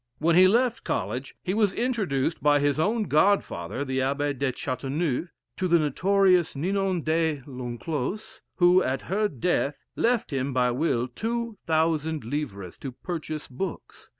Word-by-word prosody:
When 165 +2 +2
he 185 +1 +8
left 240 +4 +2
College, 120 +8 -3
he 185 - -1
was 205 -2 +2
introduced 190 - -1
by 145 +1 +4
his 145 +1 +1
own 215 +7 +1
godfather, 150 - +1
the 130 0 -1
Abbe 140 +2 0
de 135 0 -1
Chateauneuf, 140 +5 -2 0.3
to 185 - 0
the 170 -1 +5
notorious 180 +3 +3
Ninon 185 +2 0
de 160 -3 0
l'Enclos, 130 - -5
who, 180 0 +5
at 130 -4 -1
her 210 +4 0
death, 145 - -1 0.2
left 235 -9 +1
him 135 0 -1
by 125 -1 +2
will 125 -2 0
two 230 - -3
thousand 160 -1 +1
livres 115 - -5
to 135 - -5
purchase 155 0 -5
books. 170 +8 -6
155 Hz, 150 wpm, -26 LUFS, 135-185 Hz, 0.3 s, he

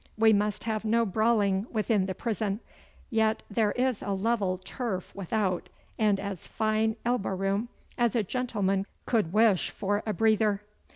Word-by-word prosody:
We 220 0 +6
must 210 0 0
have 220 -1 -2
no 230 +1 +2
brawling 210 -1 +2
within 215 -3 +1
the 190 - -3
prison. 210 -2 -2 0.5
Yet 220 -1 +2
there 210 0 +2
is 250 -2 0
a 200 - -2
level 195 -2 0
turf 190 0 -4
without, 195 -1 -1 0.3
and 210 -3 +3
as 200 -4 -5
fine 220 0 +1
elbow 235 -5 0
room 195 +4 -1 0.3
as 240 -2 +2
a 225 - +2
gentleman 200 -4 -1 0.2
could 215 -9 +1
wish 215 -2 +4
for 205 +1 -1
a - - +1
breather. 215 -2 +2
215 Hz, 155 wpm, -28 LUFS, 195-225 Hz, 0.5 s, We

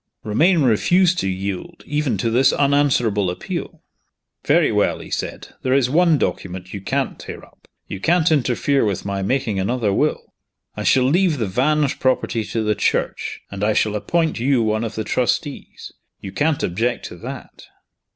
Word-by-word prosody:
Romayne 155 - +3
refused 175 - +3
to 95 - -1
yield, 100 - -5
even 145 -6 -1
to 115 +4 -1
this 130 +3 +4
unanswerable 135 -9 +2
appeal. 90 - -6 0.6
"Very - - +3
well," - - +1
he - - -11
said, - - -4
"there 130 0 +1
is 130 -2 +2
one 170 0 +4
document 95 -6 -4
you 100 - -5
can't - - -2
tear - - -9
up. - - -26 0.2
You 95 - -6
can't 170 - +2
interfere 135 -1 +2
with 100 -4 -2
my 100 -1 -2
making 110 -1 -1
another 105 +1 0
will. - - -1 0.4
I - - -5
shall 130 - +4
leave 165 +4 +2
the 115 - -1
Vange 140 +8 +1
property 130 -3 0
to 115 +1 -2
the 105 0 +1
Church, - - -1
and 100 0 -5
I 110 +1 +2
shall 105 0 +1
appoint 160 +7 0
you 125 -1 +2
one 110 +1 0
of 115 -1 -4
the 110 - -2
trustees. 135 +6 -2 0.3
You 95 - -8
can't 150 +8 0
object 115 +8 -1
to - - -10
that." - - -9
125 Hz, 170 wpm, -20 LUFS, 105-145 Hz, 0.6 s, this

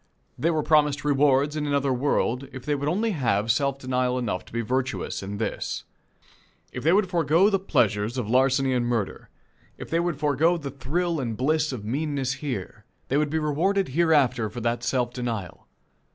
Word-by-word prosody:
They 165 - 0
were 155 -2 0
promised 150 -2 +2
rewards 145 0 +3
in 150 -1 -2
another 140 -2 +1
world, 130 0 0
if 130 -2 -9
they 150 - 0
would 145 +1 -1
only 215 +7 0
have 115 - +1
self 140 +2 0
denial 125 -1 -1
enough 105 -7 -2
to - - -17
be 115 - -1
virtuous 130 +2 -2
in 100 +1 -5
this. 110 - -3 0.9
If - - -6
they 160 - +4
would 195 +1 +3
forego 170 +3 +3
the 195 - +2
pleasures 110 - +1
of 120 -5 -2
larceny 130 +2 +3
and 120 -1 0
murder; 115 -5 -2 0.5
if - - -9
they 165 - +2
would 170 -3 -1
forego 155 +4 +2
the 145 -4 -6
thrill 160 +5 -1
and 115 -5 -3
bliss 150 +3 +1
of 115 -6 -6
meanness 140 +1 -1
here, 125 -11 -5 0.3
they 135 - +2
would 150 0 +1
be 160 - -1
rewarded 165 +6 +1
hereafter 135 -7 +2
for 110 - -7
that 120 +1 -1
self 125 -1 0
denial. 115 -8 -5
135 Hz, 185 wpm, -25 LUFS, 125-155 Hz, 0.9 s, they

